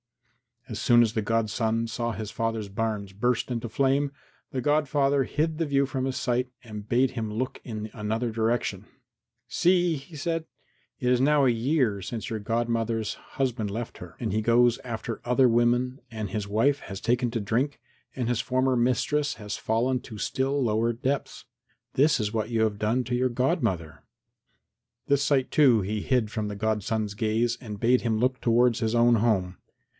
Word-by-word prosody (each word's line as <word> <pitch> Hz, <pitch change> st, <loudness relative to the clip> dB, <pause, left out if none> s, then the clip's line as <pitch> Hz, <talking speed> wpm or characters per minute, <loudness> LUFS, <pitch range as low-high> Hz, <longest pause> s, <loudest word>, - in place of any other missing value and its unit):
As 110 Hz, -, -5 dB
soon 120 Hz, -1 st, +5 dB
as 110 Hz, -1 st, 0 dB
the 110 Hz, -, 0 dB
godson 115 Hz, +1 st, 0 dB
saw 120 Hz, +1 st, -2 dB
his 110 Hz, -2 st, -5 dB
father's 115 Hz, -3 st, -2 dB
barns 100 Hz, -1 st, -3 dB
burst 120 Hz, +5 st, 0 dB
into 120 Hz, -1 st, -3 dB
flame 135 Hz, +4 st, +1 dB, 0.4 s
the 130 Hz, -, -2 dB
godfather 145 Hz, -1 st, +2 dB
hid 155 Hz, +3 st, -1 dB
the 165 Hz, -, 0 dB
view 140 Hz, -1 st, +2 dB
from 130 Hz, -1 st, -2 dB
his 135 Hz, -1 st, -2 dB
sight 125 Hz, -1 st, 0 dB
and 105 Hz, -3 st, -8 dB
bade 125 Hz, +3 st, +2 dB
him 115 Hz, -4 st, -4 dB
look 125 Hz, +5 st, -3 dB
in 110 Hz, -2 st, -6 dB
another 110 Hz, +2 st, -2 dB
direction. 110 Hz, -3 st, -1 dB, 0.6 s
"See," 175 Hz, +5 st, +2 dB
he 140 Hz, +4 st, -12 dB
said; 165 Hz, +2 st, -2 dB, 0.5 s
"it 125 Hz, -2 st, +1 dB
is 125 Hz, 0 st, +3 dB
now 145 Hz, 0 st, +4 dB
a -, -, +5 dB
year 120 Hz, -3 st, +1 dB
since 110 Hz, +4 st, -5 dB
your 110 Hz, -, -3 dB
godmother's 115 Hz, 0 st, -1 dB
husband 125 Hz, -6 st, -3 dB
left 115 Hz, +3 st, -5 dB
her, -, -, -10 dB
and -, -, -2 dB
he 110 Hz, +2 st, 0 dB
goes 120 Hz, +1 st, +4 dB
after 115 Hz, -2 st, -5 dB
other 125 Hz, +1 st, +4 dB
women 120 Hz, +3 st, +2 dB
and 110 Hz, -3 st, -5 dB
his 105 Hz, +1 st, -3 dB
wife 130 Hz, +8 st, +2 dB
has 95 Hz, 0 st, -7 dB
taken 120 Hz, +1 st, +1 dB
to 115 Hz, -2 st, -2 dB
drink 125 Hz, +8 st, -1 dB, 0.4 s
and 125 Hz, -3 st, -2 dB
his 120 Hz, -2 st, +1 dB
former 130 Hz, +1 st, +1 dB
mistress 145 Hz, +4 st, +1 dB
has 105 Hz, -1 st, -5 dB
fallen 125 Hz, +4 st, 0 dB
to 110 Hz, -, -10 dB
still 135 Hz, +5 st, 0 dB
lower 115 Hz, +1 st, +1 dB
depths. 135 Hz, +4 st, -3 dB, 0.5 s
This 145 Hz, +1 st, +3 dB
is 105 Hz, 0 st, -2 dB
what 110 Hz, -1 st, -1 dB
you 115 Hz, -2 st, 0 dB
have 105 Hz, -2 st, +1 dB
done 115 Hz, +4 st, +1 dB
to 125 Hz, +1 st, -2 dB
your 130 Hz, +1 st, +2 dB
godmother." 115 Hz, -, -1 dB, 1.0 s
This 140 Hz, 0 st, +3 dB
sight, 140 Hz, -2 st, +1 dB
too, 130 Hz, -8 st, +5 dB
he 105 Hz, +2 st, -2 dB
hid 120 Hz, -4 st, +1 dB
from 110 Hz, -2 st, -2 dB
the 105 Hz, -, -5 dB
godson's 110 Hz, 0 st, -1 dB
gaze 115 Hz, +2 st, 0 dB
and 105 Hz, -5 st, -7 dB
bade 125 Hz, +3 st, +3 dB
him 115 Hz, -2 st, 0 dB
look 125 Hz, +3 st, +1 dB
towards 120 Hz, 0 st, +3 dB
his 110 Hz, +1 st, 0 dB
own 120 Hz, 0 st, +5 dB
home. 100 Hz, -5 st, +1 dB
120 Hz, 180 wpm, -27 LUFS, 110-130 Hz, 1.0 s, soon